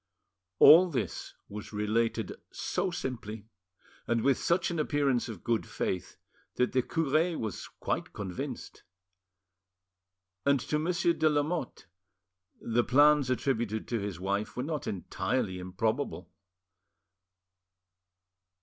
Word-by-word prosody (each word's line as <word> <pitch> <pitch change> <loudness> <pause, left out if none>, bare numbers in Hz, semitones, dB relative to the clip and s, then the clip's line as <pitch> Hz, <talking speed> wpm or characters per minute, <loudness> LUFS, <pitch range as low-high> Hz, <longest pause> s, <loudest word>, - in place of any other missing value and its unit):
All 175 - +9
this 130 -8 -4
was 105 0 -8
related 110 +2 0 0.2
so 185 +1 -2
simply, 115 - -5 0.6
and 115 -1 +1
with 135 -1 +3
such 175 +1 +1
an 170 - -2
appearance 140 -5 +1
of 105 -6 -8
good 115 -1 0
faith, 90 -3 -3 0.4
that 125 - +1
the 130 - +3
cure 160 +4 +1
was 110 -5 -4
quite - - -2
convinced. 95 -3 -6 1.6
And 140 -1 +3
to 150 - -1
Monsieur 170 +1 +1
de 160 -1 +2
Lamotte 150 0 -1 0.7
the 120 +1 +1
plans 145 +1 +5
attributed 120 -4 -1
to 115 - 0
his 100 -3 -4
wife 100 +4 -2
were 125 - -1
not 150 0 -3
entirely 95 -1 -2
improbably. 95 - -2
125 Hz, 115 wpm, -30 LUFS, 105-150 Hz, 1.6 s, All